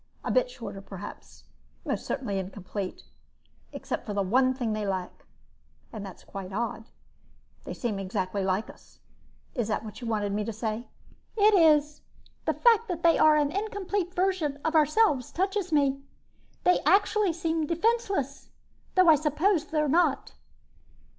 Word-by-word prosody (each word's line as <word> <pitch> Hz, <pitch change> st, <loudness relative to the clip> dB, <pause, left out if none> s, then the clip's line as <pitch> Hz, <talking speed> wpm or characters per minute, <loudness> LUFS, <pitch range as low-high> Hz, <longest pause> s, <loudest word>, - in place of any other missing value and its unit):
"A -, -, -2 dB
bit -, -, +2 dB
shorter -, -, -8 dB
perhaps, -, -, -10 dB, 0.4 s
and -, -, -2 dB
most -, -, -3 dB
certainly 200 Hz, -7 st, -2 dB
incomplete. 190 Hz, 0 st, -6 dB, 0.7 s
Except -, -, -4 dB
for 205 Hz, -, -5 dB
the 200 Hz, -, +1 dB
one 255 Hz, +7 st, +3 dB
thing 245 Hz, -4 st, -2 dB
they 215 Hz, -1 st, -2 dB
lack, 185 Hz, -2 st, -4 dB, 0.7 s
and 215 Hz, -3 st, -6 dB
that's 195 Hz, -2 st, -10 dB
quite 195 Hz, -1 st, -8 dB
odd, 225 Hz, +2 st, -3 dB, 0.8 s
they -, -, -5 dB
seem 215 Hz, -5 st, -2 dB
exactly 195 Hz, 0 st, -2 dB
like 190 Hz, +3 st, 0 dB
us. -, -, -16 dB, 0.6 s
Is 240 Hz, -5 st, -1 dB
that 220 Hz, 0 st, -2 dB
what 215 Hz, +3 st, -9 dB
you 240 Hz, -, -5 dB
wanted 210 Hz, -3 st, -1 dB
me 210 Hz, +1 st, -1 dB
to 225 Hz, -, -3 dB
say?" 220 Hz, +2 st, -4 dB, 0.5 s
"It 425 Hz, +1 st, +5 dB
is. 300 Hz, -4 st, +4 dB, 0.4 s
The -, -, +1 dB
fact 465 Hz, -1 st, +4 dB
that 345 Hz, -3 st, -4 dB
they 335 Hz, -1 st, +5 dB
are 310 Hz, -1 st, +6 dB
an 295 Hz, -1 st, +1 dB
incomplete 400 Hz, -2 st, -3 dB
version 360 Hz, -6 st, 0 dB
of 320 Hz, -, +1 dB
ourselves 305 Hz, -, +3 dB
touches 385 Hz, 0 st, -1 dB
me. 275 Hz, -2 st, +2 dB, 0.6 s
They 360 Hz, -, +4 dB
actually 405 Hz, 0 st, +3 dB
seem 325 Hz, -1 st, -1 dB
defenseless, 365 Hz, -, -1 dB, 0.5 s
though 370 Hz, -1 st, +5 dB
I 320 Hz, -, +9 dB
suppose 310 Hz, +4 st, +1 dB
they're 305 Hz, -2 st, 0 dB
not." 300 Hz, -2 st, +1 dB
295 Hz, 155 wpm, -27 LUFS, 215-360 Hz, 0.8 s, I